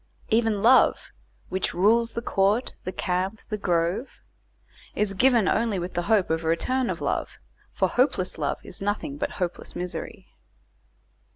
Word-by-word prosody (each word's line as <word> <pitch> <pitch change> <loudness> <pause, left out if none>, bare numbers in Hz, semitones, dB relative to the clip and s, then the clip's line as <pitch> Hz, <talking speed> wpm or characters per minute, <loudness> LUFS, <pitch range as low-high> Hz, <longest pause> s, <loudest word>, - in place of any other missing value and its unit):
Even 220 -3 +2
love 255 +3 +6 0.5
"which 190 0 -2
rules 230 +5 +3
the 235 - -4
court, 205 +4 +1
the 185 - -2
camp, 185 +4 -2
the 215 - -1
grove" 175 +5 0 0.9
is 205 -1 0
given 235 -1 +4
only 225 -3 +1
with 180 0 -4
the 175 - 0
hope 205 -6 +3
of 160 0 0
a - - -3
return 250 +10 0
of - - -3
love; - - -2 0.3
for - - +1
hopeless 215 - 0
love 145 - -1
is 180 - -5
nothing 210 +9 -2
but - - -2
hopeless 180 -2 -4
misery. 180 0 -6
200 Hz, 155 wpm, -25 LUFS, 180-235 Hz, 0.9 s, love